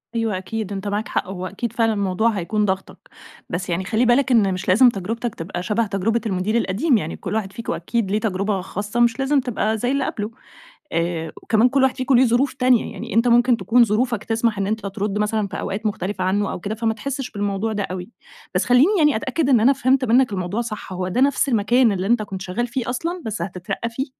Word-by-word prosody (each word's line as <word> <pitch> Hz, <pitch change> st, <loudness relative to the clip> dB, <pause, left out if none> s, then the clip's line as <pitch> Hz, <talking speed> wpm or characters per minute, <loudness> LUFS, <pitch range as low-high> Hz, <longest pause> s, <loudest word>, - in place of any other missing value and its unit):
أيوه 225 Hz, -4 st, 0 dB
أكيد 205 Hz, +2 st, -5 dB
أنتَ 195 Hz, +1 st, -4 dB
معاك 205 Hz, +2 st, -2 dB
حق، -, -, -2 dB
هو 185 Hz, -1 st, -5 dB
أكيد 220 Hz, +4 st, -4 dB
فعلًا 225 Hz, -2 st, +2 dB
الموضوع 200 Hz, +2 st, +1 dB
هيكون 210 Hz, +1 st, -1 dB
ضاغطَك. 190 Hz, 0 st, -3 dB, 0.5 s
بس 180 Hz, +1 st, -4 dB
يعني 175 Hz, +2 st, -1 dB
خَلّي 225 Hz, +4 st, +1 dB
بالَك 255 Hz, +3 st, +3 dB
إنّ 200 Hz, -5 st, +4 dB
مش 185 Hz, -, -5 dB
لازم 240 Hz, +7 st, +6 dB
تجربتَك 225 Hz, +3 st, -4 dB
تبقى 175 Hz, +1 st, -5 dB
شبه 210 Hz, +3 st, 0 dB
تجربة 220 Hz, +4 st, 0 dB
المدير 195 Hz, +1 st, -1 dB
القديم، 235 Hz, -, +2 dB
يعني 165 Hz, -5 st, -4 dB
كُلّ -, -, -4 dB
واحد 205 Hz, -3 st, -2 dB
فيكم 230 Hz, -, -4 dB
أكيد 230 Hz, -5 st, -2 dB
ليه 210 Hz, -, +2 dB
تجربة 200 Hz, -2 st, -1 dB
خاصّة 205 Hz, +5 st, -4 dB
مش 235 Hz, +1 st, +3 dB
لازم 275 Hz, +1 st, +2 dB
تبقى 220 Hz, -3 st, -1 dB
زَيّ 245 Hz, +4 st, -1 dB
اللي 275 Hz, -1 st, 0 dB
قبله. 210 Hz, -2 st, -4 dB, 0.6 s
آآ، 165 Hz, -1 st, -1 dB
وكمان 225 Hz, +3 st, +3 dB
كُلّ 275 Hz, +1 st, +2 dB
واحد 265 Hz, -, +2 dB
فيكم 260 Hz, 0 st, +1 dB
ليه 255 Hz, -, +6 dB
ظروف 245 Hz, +3 st, +2 dB
تانية، 250 Hz, -2 st, +2 dB
يعني -, -, -7 dB
أنتَ 230 Hz, +2 st, +3 dB
ممكن 240 Hz, 0 st, +4 dB
تكون 230 Hz, +5 st, +4 dB
ظروفَك 230 Hz, 0 st, 0 dB
تسمح 225 Hz, -1 st, 0 dB
إنّ 195 Hz, 0 st, -1 dB
أنتَ 215 Hz, -1 st, -2 dB
ترُدّ 200 Hz, +1 st, -2 dB
مثلًا 210 Hz, 0 st, 0 dB
في 200 Hz, 0 st, -6 dB
أوقات 205 Hz, +3 st, -4 dB
مختلفة 195 Hz, -2 st, -2 dB
عنه 195 Hz, +2 st, 0 dB
أو -, -, -5 dB
كده 205 Hz, +4 st, -4 dB
فما 225 Hz, 0 st, 0 dB
تحسش 265 Hz, +4 st, -5 dB
بالموضوع 205 Hz, +1 st, -2 dB
ده 205 Hz, -1 st, -1 dB
أوي. 185 Hz, +2 st, -5 dB, 0.5 s
بس -, -, +2 dB
خَلّيني 280 Hz, +12 st, +4 dB
يعني 300 Hz, -6 st, +4 dB
أتأكد 265 Hz, +5 st, -1 dB
إنّ 245 Hz, -4 st, +5 dB
أنا 255 Hz, +5 st, +5 dB
فهمت 265 Hz, 0 st, +2 dB
منَّك 245 Hz, 0 st, +3 dB
الموضوع 185 Hz, +4 st, -2 dB
صح، 215 Hz, -5 st, -6 dB
هو 180 Hz, 0 st, -3 dB
ده 215 Hz, +8 st, 0 dB
نفس 275 Hz, 0 st, +2 dB
المكان 235 Hz, +1 st, +3 dB
اللي 190 Hz, -1 st, -2 dB
أنتَ 235 Hz, 0 st, +3 dB
كنت 195 Hz, -2 st, -6 dB
شغّال 195 Hz, +6 st, -2 dB
فيه 245 Hz, 0 st, -3 dB
أصلًا 335 Hz, +8 st, -3 dB
بس 215 Hz, -1 st, -4 dB
هتترقّى 185 Hz, +5 st, -4 dB
فيه، 260 Hz, +4 st, -3 dB
220 Hz, 225 wpm, -21 LUFS, 195-245 Hz, 0.6 s, لازم